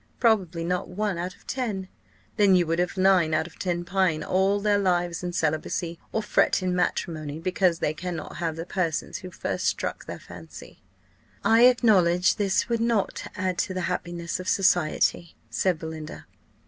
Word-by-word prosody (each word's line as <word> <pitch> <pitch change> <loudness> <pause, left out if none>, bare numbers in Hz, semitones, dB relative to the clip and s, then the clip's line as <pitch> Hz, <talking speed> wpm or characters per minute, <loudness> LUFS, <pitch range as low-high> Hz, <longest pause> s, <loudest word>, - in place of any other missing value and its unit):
_ - - -37
Probably 190 -8 +2
not 180 +1 -1
one 195 -1 -2
out 180 +1 -4
of - - -25
ten. 215 -8 -3 0.5
Then, 200 -2 +5
would 170 -2 +2
you - - +5
have 180 - -6
nine 185 -4 +4
out 155 0 +1
of 175 - -13
ten 175 -2 -2
pine 180 -5 +1
all 190 +4 +2
their 205 0 +2
lives 175 -3 0
in 180 -1 -3
celibacy, 165 +1 -2
or 220 - -1
fret 200 - +2
in 180 -1 0
matrimony, 155 -4 -2
because 180 0 +1
they 150 - -1
cannot 170 0 -6
have 165 -3 -2
the 165 +1 -5
persons 175 -3 -2
who 185 -1 -8
first 180 - -3
struck - - -2
their - - -5
fancy?" - - -12 0.6
"I 225 +2 +6
acknowledge 190 -8 +4
this 200 -2 +1
would 235 -1 0
not 230 -4 0
add 185 0 -2
to 185 - -1
the 185 - -1
happiness 175 -1 -3
of 185 - -7
society," 175 -2 +2 0.2
said 185 -3 +1
Belinda. 160 -1 -7
180 Hz, 175 wpm, -26 LUFS, 170-195 Hz, 0.6 s, I